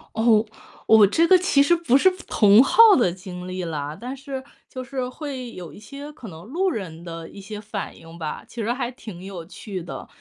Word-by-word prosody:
哦， 220 -1 +4 0.4
我 220 -2 +7
这 330 - +3
个 370 +1 +6
其 350 -6 +3
实 345 +5 +4
不 310 -7 +2
是 375 +7 +5 0.2
同 210 +2 +6
好 275 - -2 0.2
的 185 -7 +3
经 180 -1 -9
历 185 0 -4
啦， 150 -2 -4
但 250 +3 -6
是 270 -1 -7 0.2
就 255 -1 -7
是 255 -1 -4
会 260 -3 -7
有 170 -5 -9
一 - - -13
些 280 +7 -9
可 255 -7 -11
能 165 -1 -11
路 360 - -1
人 170 - -6
的 165 -1 -8
一 200 - -11
些 210 +2 -8
反 210 -1 -6
应 165 +1 -13
吧， 155 -2 -5
其 240 - -8
实 230 +3 0
还 245 -1 -3
挺 205 -7 -10
有 185 -4 -7
趣 190 -1 -7
的。 170 - -8
220 Hz, 230 characters per minute, -23 LUFS, 180-265 Hz, 0.4 s, 我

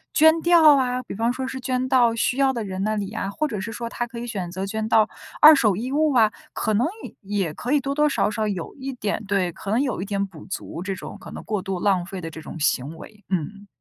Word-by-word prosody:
捐 320 +1 +6
掉 325 -4 +7
啊， 250 -1 0
比 - - -8
方 230 +4 0
说 260 0 -4
是 265 0 -5
捐 255 0 -1
到 240 -3 +4
需 245 +3 0
要 270 -1 +3
的 230 -3 -3
人 190 -1 -4
那 215 +1 0
里 205 0 -3
啊， 200 -2 -3
或 305 +9 -1
者 210 - -3
是 215 +4 -5
说 235 +1 -5
她 240 - -3
可 235 - -10
以 240 - -5
选 190 -6 -4
择 190 +2 -3
捐 220 +2 -3
到 220 -1 +4 0.3
二 310 +1 +11
手 215 -8 +3
衣 245 +6 -4
物 305 0 +2
啊， 220 -3 +5 0.2
可 215 - -1
能 235 +8 +2 0.2
也 - - -8 0.3
也 155 - -6
可 250 - -3
以 290 - +3
多 275 +2 -2
多 300 +1 +3
少 270 - +1
少 215 0 -1
有 185 -5 -4
一 270 -1 -5
点 215 -3 -2
对， 190 -3 +1
可 195 - -9
能 235 +5 +3
有 255 -9 -1
一 - - -3
点 200 0 -1
补 170 -6 -12
足， 180 -2 -6
这 190 +1 -3
种 - - -8
可 - - -11
能 - - -8
过 210 -3 -2
度 190 -2 -4
浪 190 -4 +2
费 190 -1 -7
的 165 - -5
这 160 - -9
种 160 - -8
行 145 +1 0
为。 210 +4 -13
嗯。 200 +3 -3
220 Hz, 290 characters per minute, -23 LUFS, 195-260 Hz, 0.3 s, 二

